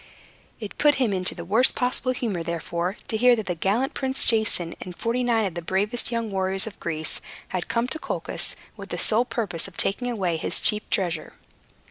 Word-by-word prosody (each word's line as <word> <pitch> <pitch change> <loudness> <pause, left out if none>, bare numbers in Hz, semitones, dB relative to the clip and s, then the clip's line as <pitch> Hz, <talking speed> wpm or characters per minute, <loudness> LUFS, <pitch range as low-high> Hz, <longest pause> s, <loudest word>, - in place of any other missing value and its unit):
It 210 -3 -8
put 295 -1 +5
him 240 -6 +1
into 185 -1 +2
the 170 - -7
worst 225 +8 +4
possible 255 0 0
humor, 225 -8 -2
therefore, 170 +2 -3
to 220 - -1
hear 245 +2 +6
that 220 -3 -4
the 180 - -1
gallant 205 +10 0
Prince 265 -1 +2
Jason, 215 -7 +3
and 180 -1 -8
forty 240 +2 0
nine 230 -3 +2
of 190 - -3
the 175 - -4
bravest 205 +8 0
young 230 -2 -2
warriors 190 0 +2
of 220 -2 -9
Greece, 160 -2 -3 0.3
had 180 -2 -3
come 235 +1 0
to 315 - -3
Colchis - - -2 0.2
with - - -10
the - - -3
sole 230 +3 +4
purpose 195 -10 -2
of 195 - -14
taking 245 +5 -1
away 185 -8 -1
his - - -1
chief 210 -1 +2
treasure. 175 -4 -1
210 Hz, 200 wpm, -25 LUFS, 180-240 Hz, 0.3 s, hear